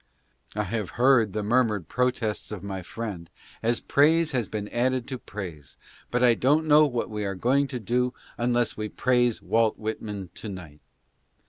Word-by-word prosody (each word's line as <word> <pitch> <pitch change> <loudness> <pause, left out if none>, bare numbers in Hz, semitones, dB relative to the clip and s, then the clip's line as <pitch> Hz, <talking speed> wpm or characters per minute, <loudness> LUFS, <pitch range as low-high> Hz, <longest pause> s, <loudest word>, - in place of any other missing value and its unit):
I 105 - 0
have 105 -1 -3
heard 120 -4 +4
the 105 0 -2
murmured 105 -5 +1
protests 125 -5 -1
of 100 -3 -6
my 95 -2 -4
friend 95 -3 -6 0.3
as 115 +1 +1
praise 160 +3 +3
has 125 -5 0
been 105 -1 -4
added 125 +1 0
to 130 -2 -4
praise, 85 - -8 0.3
but 125 0 +1
I 120 -1 +7
don't 145 +7 +2
know 150 0 +6
what 120 -4 -3
we 105 -1 -3
are 100 -1 -2
going 135 +8 +2
to 130 -2 -5
do 125 +3 0 0.2
unless 120 0 +1
we 105 0 -4
praise 120 -1 +1
Walt 115 -1 +2
Whitman 105 -4 -5
to 110 - -7
night. 80 -6 -9
115 Hz, 170 wpm, -26 LUFS, 105-125 Hz, 0.3 s, I